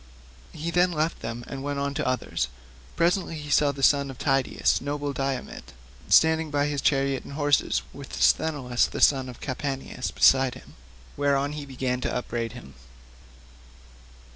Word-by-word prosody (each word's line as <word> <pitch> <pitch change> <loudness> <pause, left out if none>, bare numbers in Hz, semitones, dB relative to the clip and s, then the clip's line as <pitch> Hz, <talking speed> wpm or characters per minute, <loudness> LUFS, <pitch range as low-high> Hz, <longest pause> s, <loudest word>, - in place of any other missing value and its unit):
He 160 +2 -4
then 180 +1 +3
left 160 0 -1
them 115 +1 -5
and 135 - -7
went 145 0 -3
on 140 0 -1
to - - -2
others. 130 -1 -1 0.5
Presently 175 0 +1
he 150 -1 -7
saw 145 -1 +4
the 135 -1 -7
son 140 -1 +4
of 130 - -8
Tydeus, 135 -2 +1
noble 145 +1 -3
Diomed, 135 -1 -4 0.4
standing 160 0 +4
by 145 -1 +1
his 145 -2 -2
chariot 135 -1 +1
and - - -10
horses, 145 -1 +1
with - - -8
Sthenelus 140 -6 +2
the - - -6
son 130 -2 +4
of 125 - -10
Capaneus 135 -1 -4
beside 130 -1 +4
him; 130 - -14 0.4
whereon 140 0 +1
he 150 -1 -6
began 130 -1 -2
to - - -1
upbraid 120 -2 -3
him. 65 - -11
140 Hz, 160 wpm, -26 LUFS, 130-150 Hz, 0.5 s, saw